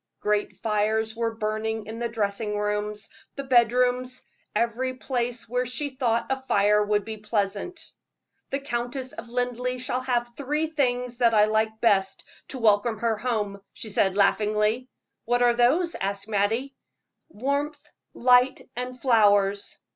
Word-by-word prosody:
Great 210 0 0
fires 220 +1 0
were 230 -1 -1
burning 220 0 -2
in 225 +2 -7
the 235 0 -1
dressing 210 -1 -2
rooms, 210 0 -1 0.3
the 275 - -4
bedrooms 250 0 +2 0.3
every 235 +4 0
place 245 -2 -2
where 250 +2 0
she 265 +4 -3
thought 240 -3 0
a 265 0 -1
fire 210 +1 +4
would 210 -1 0
be 220 -1 -6
pleasant. 210 - -3 0.6
"The 275 - -1
Countess 255 0 -3
of 230 +1 -9
Linleigh 250 +1 -1
shall 250 0 -2
have 245 -2 0
the 240 +4 -10
three 300 +4 0
things 250 -6 -1
that 235 -2 +3
I 210 0 +6
like 220 0 0
best 195 -4 +2 0.2
to 270 - -6
welcome 220 -1 +3
her 230 +1 0
home," 210 -3 -2
she 220 - -6
said, 195 -1 +2
laughingly. 215 +4 +2 0.4
"What 245 +1 +2
are 240 -1 +5
those?" 280 +9 +3
asked 200 +1 -3
Mattie. 220 +6 0 0.6
"Warmth, 285 +3 -2 0.3
light, 250 +1 +4 0.2
and 250 +1 -5
flowers. 205 -5 +3
235 Hz, 145 wpm, -26 LUFS, 210-250 Hz, 0.6 s, I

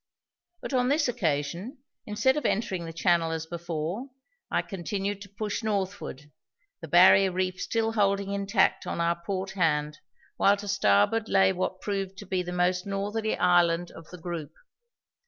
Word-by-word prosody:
But - - -6
on 250 -1 +2
this 290 0 +2
occasion, 175 - -2 0.3
instead 215 +6 +2
of 300 - -2
entering 190 -5 -1
the 165 - -6
channel 165 0 +2
as 160 0 -3
before, 170 - -4 0.4
I - - 0
continued 195 +1 -4
to 200 - -10
push 205 +1 -4
northward, 195 - -3 0.5
the 160 - -7
barrier 185 +3 +6
reef 185 0 -2
still 225 -1 0
holding 200 -2 +1
intact 200 0 +1
on - - -3
our 170 0 0
port 190 +1 -3
hand 150 -5 0 0.4
while 200 +1 +4
to 205 +1 -8
starboard 195 - +2
lay 190 0 +4
what 185 0 -3
proved 195 -2 -3
to - - -9
be 185 0 -1
the 180 0 -5
most 180 +1 0
northerly 205 +3 -2
island 175 -1 +3
of 165 -1 -13
the 180 - -10
group. 170 -3 -6
190 Hz, 160 wpm, -27 LUFS, 170-205 Hz, 0.5 s, barrier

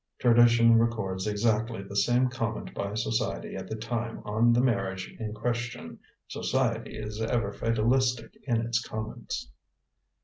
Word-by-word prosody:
Tradition 115 -1 +6
records 105 -5 -1
exactly 110 0 0
the 100 +1 -9
same 120 +5 +3
comment 115 -3 -3
by 100 +1 -3
society 110 0 -2
at - - -6
the 110 - -4
time 115 +1 -3
on 110 +3 +3
the 120 - +4
marriage 95 -7 0
in 110 -2 -3
question. 120 -1 -4 0.3
Society 120 -3 -1
is 105 0 -5
ever 110 -3 0
fatalistic 115 +3 +1
in 115 -3 +2
its 115 0 0
comments. 110 - -5
115 Hz, 135 wpm, -28 LUFS, 105-120 Hz, 0.3 s, Tradition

